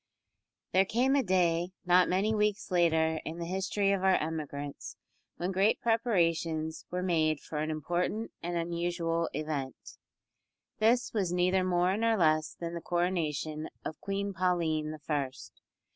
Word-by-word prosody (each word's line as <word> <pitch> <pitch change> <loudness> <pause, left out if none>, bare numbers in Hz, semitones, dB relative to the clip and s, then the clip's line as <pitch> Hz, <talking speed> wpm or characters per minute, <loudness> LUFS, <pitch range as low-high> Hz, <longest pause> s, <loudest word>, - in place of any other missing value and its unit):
There 190 - +5
came 245 +7 +2
a 280 - +4
day, 180 -4 +1
not 180 0 +5
many 195 +4 +2
weeks 210 -1 0
later 160 -2 +3
in 160 - -6
the 170 - -4
history 190 +2 0
of 195 -1 0
our 190 -1 +5
emigrants, 150 -2 -4 0.4
when 180 +2 -2
great 195 +3 +2
preparations 165 -9 0
were 180 0 -2
made 155 -4 +2
for 150 - -5
an 155 +1 -1
important 175 +8 -2
and 175 0 -2
unusual 170 0 -1
event. 145 -3 -5 0.8
This 240 +3 +3
was 195 -6 0
neither 180 +1 +2
more 180 +1 +2
nor 225 0 +2
less 155 -3 +2
than 170 0 -4
the 170 - -5
coronation 160 -4 -1 0.2
of 155 - -6
Queen 200 0 -2
Pauline 170 -4 0
the 155 - -6
First. 140 -3 -4
175 Hz, 145 wpm, -30 LUFS, 160-190 Hz, 0.8 s, There